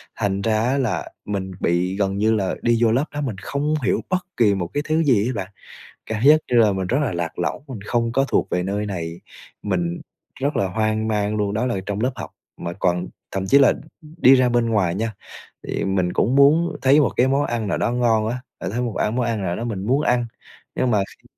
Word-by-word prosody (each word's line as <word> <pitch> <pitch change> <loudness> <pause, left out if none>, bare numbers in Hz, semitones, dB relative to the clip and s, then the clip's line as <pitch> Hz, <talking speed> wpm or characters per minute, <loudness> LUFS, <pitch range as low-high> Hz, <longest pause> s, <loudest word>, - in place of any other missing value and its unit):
Thành 100 -2 -1
ra 110 0 +1
á 130 +4 +1
là 125 -6 -1 0.2
mình 95 -2 -3
bị 90 +2 0
gần 100 -1 0
như 110 +2 +2
là 95 -3 -1
đi 120 -1 +2
vô 115 - +4
lớp 130 +6 +2
đó 145 - -3
mình 125 -7 -3
không 140 +9 -2
hiểu - - +1
bất 185 -1 -1
kỳ 105 -4 +4
một 90 -3 -2
cái 145 - -1
thứ 160 +1 +1
gì 120 -6 +3
đó 130 - -1
bạn, 95 -2 -5 0.6
cảm 110 -1 -3
giác 155 +2 +7
như 120 - +3
là 110 -3 +5
mình 95 -1 -2
rất 125 +8 +1
là 135 -9 0
lạc 85 -1 -4
lõng, 90 - -2
mình 120 -6 -7
không 115 -1 0
có 135 +1 +2
thuộc - - 0
về 90 - 0
nơi 100 +3 -2
này, 85 -3 -5 0.4
mình 85 -3 -2 0.4
rất 145 +3 0
là 95 - +1
hoang 110 +1 -1
mang 105 0 0
luôn. 105 -1 -1
Đó 115 +4 0
là 110 -7 -1
trong 100 0 -3
lớp 125 +3 +1
học - - -7 0.3
mà 85 - -4
còn 90 -1 0 0.2
thậm 95 0 -3
chí 140 - +6
là 135 - +6 0.5
đi 135 -2 +7
ra 130 -1 +4
bên 120 -1 +2
ngoài 95 -6 +1
nha, 110 +1 -2 0.5
thì - - -2
mình 95 -2 0
cũng 125 +5 +1
muốn 155 +5 +4
thấy 135 +3 +5
một 140 - +1
cái 125 - +4
món 140 +2 +2
ăn 115 -3 -2
nào - - 0
đó - - 0
ngon 115 -3 +2
á, 120 +3 -2 0.2
ờ, - - -4
thấy 120 +6 -2
một 120 -3 -3
ăn 110 +3 0
món 125 - +1
ăn 115 -3 -1
nào 90 -1 -1
đó - - -4
mình 105 -5 -4
muốn 135 +4 +2
ăn, 120 -4 +1 0.5
nhưng 130 - +1
mà 105 - +3
kh - - -15
110 Hz, 245 wpm, -22 LUFS, 95-125 Hz, 0.6 s, giác